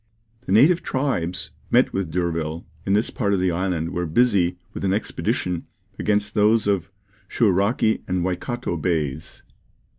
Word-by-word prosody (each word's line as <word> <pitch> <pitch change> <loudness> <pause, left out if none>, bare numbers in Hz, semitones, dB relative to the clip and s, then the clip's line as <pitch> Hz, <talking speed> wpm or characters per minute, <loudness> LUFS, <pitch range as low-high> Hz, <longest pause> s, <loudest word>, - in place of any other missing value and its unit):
The - - -2
native 150 - +5
tribes 125 -11 -2 0.2
met - - +3
with 95 -2 -1
by 80 - -11
D'Urville 85 -2 -2 0.2
in 95 - +2
this 105 +2 +1
part 100 -4 0
of - - 0
the 90 -1 +2
island 85 -2 -1
were 90 -1 -2
busy 90 -2 +2 0.2
with - - -6
an 95 -1 +2
expedition 90 -4 -2 0.3
against 105 0 0
those 105 +1 +3
of 100 -3 0 0.4
Shouraki 110 +3 +2
and 90 -1 0
Waikato 95 +2 -2
Bays. 80 -3 -2
95 Hz, 150 wpm, -23 LUFS, 85-105 Hz, 0.4 s, native